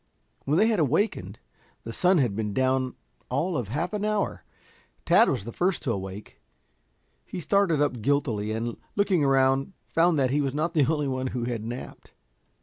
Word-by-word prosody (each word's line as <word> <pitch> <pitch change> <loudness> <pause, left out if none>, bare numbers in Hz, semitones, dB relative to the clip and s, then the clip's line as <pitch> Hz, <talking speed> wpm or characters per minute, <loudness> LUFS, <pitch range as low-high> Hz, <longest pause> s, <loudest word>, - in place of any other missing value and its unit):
When 145 +3 +2
they 220 +4 +4
awakened 150 - 0 0.5
the 115 - -6
sun 180 +6 +3
had 120 -9 +1
been 105 -2 -3
down 130 -1 +1 0.3
all 160 +8 -1
of 125 -7 -2
half 155 - -3
an 210 -1 -2
hour. 210 -1 -1 0.6
Tad - - +5
was 95 - -2
the 120 - -6
first 180 +7 0
to 135 - 0
awake. 95 0 -6 0.8
He 185 - -7
started 175 -1 +2
up 135 -5 0
guiltily, 115 -5 0
and 115 +1 -3 0.2
looking 195 -6 +2
around 135 +3 +2
found 165 0 +2
that 130 -2 +2
he 145 +2 +2
was 135 -1 -2
not 160 +3 -1
the 150 -3 +3
only 150 -3 0
one 130 -1 -2
who 125 -2 -3
had 120 -2 -3
napped. 120 +3 -8
135 Hz, 175 wpm, -26 LUFS, 120-170 Hz, 0.8 s, Tad